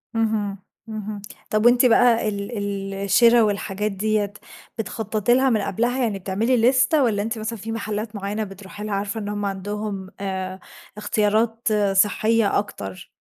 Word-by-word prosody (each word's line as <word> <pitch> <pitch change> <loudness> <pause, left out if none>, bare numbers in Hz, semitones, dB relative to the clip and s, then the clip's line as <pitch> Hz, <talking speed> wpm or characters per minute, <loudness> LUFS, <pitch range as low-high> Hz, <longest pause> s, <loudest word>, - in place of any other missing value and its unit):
اهم، 215 -3 0 0.3
اهم. 215 -1 -5 0.3
طَب 215 +1 +1
وأنتِ 245 +1 +6
بقى 235 -2 +4
ال 200 +2 -5
ال 200 -1 -3
الشِرا 230 +5 +4
والحاجات 210 -1 -1
ديّة 205 +1 0 0.4
بتخطَّطي 220 0 0
لها 260 +2 +4
من 220 -4 +2
قبلها، 240 +6 0
يعني 210 -4 -1
بتعملي 210 +7 0
ليستة 255 +5 +4
والّا 215 -5 +1
أنتِ 225 +2 -3
مثلًا 220 +1 -4
في 225 +3 -6
محلّات 215 0 -4
معيّنة 205 +2 -3
بتروحي 200 +1 -9
لها 210 -1 -3
عارفة 200 +2 -2
إن 205 -1 -4
هم 205 0 -3
عندهم 200 0 -4
آآ 190 -1 -4 0.4
اختيارات 215 +2 0 0.3
صحّية 215 +2 +3
أكتر؟ 95 - -7
210 Hz, 150 wpm, -23 LUFS, 200-225 Hz, 0.4 s, وأنتِ